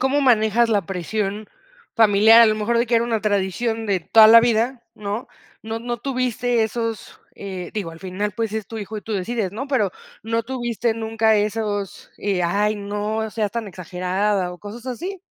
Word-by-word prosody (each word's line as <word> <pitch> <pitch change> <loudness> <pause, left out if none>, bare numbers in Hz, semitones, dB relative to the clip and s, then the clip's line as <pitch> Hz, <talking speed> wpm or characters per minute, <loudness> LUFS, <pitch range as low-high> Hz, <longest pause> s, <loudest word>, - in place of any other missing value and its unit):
cómo 265 +3 +2
manejas 235 -3 +3
la 210 -3 +2
presión 200 +3 -3 0.5
familiar? 220 +1 +6
A - - +7
lo 215 - +2
mejor 215 +2 0
de 235 - +1
que 235 - 0
era 230 0 +3
una 230 -2 -1
tradición 215 +2 -1
de 195 -3 +1
toda 220 +6 +7
la 230 +1 +9
vida, 235 +2 +1
¿no? 210 +3 -4 0.4
No 225 +1 -4
no 240 +1 -4
tuviste 245 -2 0
esos, 225 0 -4
eh, 185 -3 -7
digo, 200 -6 -4
al 165 0 -13
final, 195 +2 -3
pues, 225 +1 -3
es 220 -2 -3
tu 225 - -7
hijo 215 +1 -6
y 210 - -6
tú 225 - -6
decides, 205 0 -2
¿no? 245 +7 -5
Pero, 245 -9 +1 0.3
¿no 230 +1 -1
tuviste 240 -2 -2
nunca 220 -1 +1
esos, 205 -1 -2
eh: 195 -3 -1
"Ay 205 +5 +1
no 210 +2 -3
seas 210 -2 -2
tan 230 -3 -4
exagerada", 185 +1 -2
o, 180 - -11
cosas 225 +6 -10
así? 350 +9 -5
220 Hz, 190 wpm, -22 LUFS, 205-230 Hz, 0.5 s, la